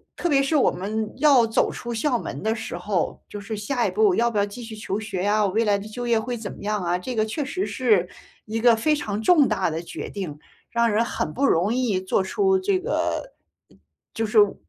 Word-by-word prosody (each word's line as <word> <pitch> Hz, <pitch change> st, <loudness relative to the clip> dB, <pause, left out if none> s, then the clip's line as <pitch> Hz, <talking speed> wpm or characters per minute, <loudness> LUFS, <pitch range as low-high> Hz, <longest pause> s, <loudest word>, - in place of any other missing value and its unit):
特 350 Hz, -, -2 dB
别 280 Hz, -4 st, +4 dB
是 275 Hz, +3 st, 0 dB
我 280 Hz, -, +4 dB
们 210 Hz, +3 st, -3 dB
要 270 Hz, -5 st, +5 dB
走 225 Hz, -, +1 dB
出 240 Hz, -1 st, -6 dB
校 245 Hz, +2 st, +1 dB
门 -, -, -6 dB
的 220 Hz, +1 st, 0 dB
时 220 Hz, -6 st, -6 dB
候， 180 Hz, -1 st, -2 dB
就 205 Hz, -, -7 dB
是 215 Hz, +2 st, -5 dB
下 235 Hz, +4 st, -1 dB
一 -, -, -2 dB
步 425 Hz, -3 st, +3 dB
要 235 Hz, 0 st, +2 dB
不 210 Hz, -, 0 dB
要 200 Hz, -, +3 dB
继 215 Hz, +4 st, -9 dB
续 225 Hz, -1 st, -8 dB
求 210 Hz, -1 st, -3 dB
学 200 Hz, -4 st, -4 dB
呀， 210 Hz, +1 st, +2 dB
我 190 Hz, -, 0 dB
未 225 Hz, +3 st, +2 dB
来 205 Hz, -2 st, +2 dB
的 200 Hz, +2 st, -8 dB
就 240 Hz, +3 st, -5 dB
业 230 Hz, -2 st, +3 dB
会 245 Hz, +2 st, -3 dB
怎 220 Hz, -3 st, -6 dB
么 -, -, -11 dB
样 210 Hz, -2 st, -1 dB
啊？ 175 Hz, +1 st, +1 dB
这 245 Hz, +8 st, -5 dB
个 215 Hz, -, +2 dB
确 270 Hz, +7 st, -3 dB
实 370 Hz, +7 st, -2 dB
是 210 Hz, -9 st, +2 dB, 0.4 s
一 220 Hz, +1 st, -3 dB
个 235 Hz, -1 st, +5 dB
非 300 Hz, +7 st, +2 dB
常 215 Hz, -7 st, -3 dB
重 300 Hz, +1 st, +5 dB
大 185 Hz, -, 0 dB
的 160 Hz, +1 st, -3 dB
决 -, -, -7 dB
定， 170 Hz, -8 st, -6 dB, 0.3 s
让 235 Hz, -1 st, +2 dB
人 225 Hz, +3 st, +2 dB
很 155 Hz, -, -3 dB
不 280 Hz, -, +1 dB
容 200 Hz, +1 st, +2 dB
易 230 Hz, -7 st, 0 dB
做 190 Hz, 0 st, +1 dB
出 385 Hz, -, +2 dB
这 380 Hz, -1 st, +1 dB
个 -, -, -2 dB, 0.8 s
就 225 Hz, 0 st, -1 dB
是， 215 Hz, +1 st, +1 dB
呃， 205 Hz, -1 st, +3 dB
220 Hz, 260 characters per minute, -24 LUFS, 205-255 Hz, 0.8 s, 要